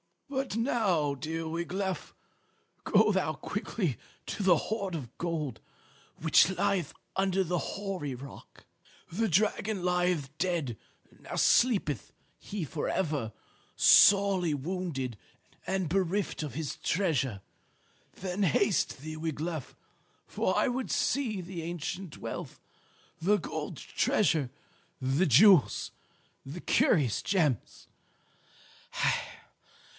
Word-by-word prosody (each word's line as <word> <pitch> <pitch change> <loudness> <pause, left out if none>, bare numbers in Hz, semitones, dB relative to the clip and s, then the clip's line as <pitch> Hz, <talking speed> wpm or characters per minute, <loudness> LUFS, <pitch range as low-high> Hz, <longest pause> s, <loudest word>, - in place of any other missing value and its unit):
"But 265 -5 -2
now, 205 - +1
dear 160 +4 -4
Wiglaf, 180 +4 -3 0.7
go 215 +1 +4
thou 190 -5 0
quickly 180 - -3 0.3
to - - -4
the 185 -3 +5
hoard 200 -1 -3
of 130 -7 -7
gold 155 -8 -3 0.6
which 160 +2 +5
lieth 180 -3 0 0.2
under 190 0 +2
the 175 0 -1
hoary 185 -10 -4
rock. 135 +2 -12 0.5
The 225 +7 0
dragon 205 +1 +1
lieth 175 -6 0
dead; 165 -11 -1 0.4
now - - -7
sleepeth 190 - +2 0.3
he 200 -3 -5
for 150 +1 -3
ever, 145 -11 -1 0.4
sorely 195 -5 +6
wounded 145 - -3 0.5
and 190 -2 0
bereft 190 +1 0
of 150 -3 -5
his 155 -2 -4
treasure. 140 - 0 0.7
Then 185 +1 -4
haste 195 -2 +2
thee, 155 +2 -7
Wiglaf, 160 -2 -4 0.5
for - - -1
I - - +3
would 255 +1 -2
see 235 -8 0
the 175 -1 -6
ancient 170 +1 -5
wealth, - - -6 0.6
the 205 +5 +4
gold - - -5
treasure, 160 -10 +1 0.5
the 135 +8 +1
jewels, 170 - +5 0.5
the 150 +6 -8
curious 130 -9 +2
gems. 155 - -1
175 Hz, 105 wpm, -30 LUFS, 150-195 Hz, 0.7 s, sorely